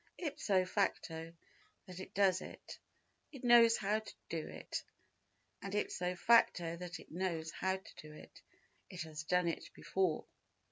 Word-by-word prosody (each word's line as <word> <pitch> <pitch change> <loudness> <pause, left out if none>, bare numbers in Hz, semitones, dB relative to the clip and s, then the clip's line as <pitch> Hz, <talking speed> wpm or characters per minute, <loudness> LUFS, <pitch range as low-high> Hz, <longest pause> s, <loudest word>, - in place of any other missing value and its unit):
Ipso 205 - +1
facto 165 -2 -1 0.5
that 185 -1 -9
it 190 - -9
does 190 -2 +4
it, - - -10 0.5
it 275 -4 -10
knows 235 -1 +7
how 210 +2 +1
to 220 - -11 0.2
do - - -3
it, - - -5 0.8
and 200 0 -4
ipso 180 -3 -1
facto 175 -5 +4
that 175 0 -6
it - - -15
knows 165 -2 -2
how 190 0 0
to 190 - -15
do 155 - -11
it, 150 - -13 0.5
it 180 -3 -5
has 155 -1 -6
done 180 +2 +2
it 165 - -3
before. 185 -5 0
185 Hz, 150 wpm, -36 LUFS, 170-200 Hz, 0.8 s, knows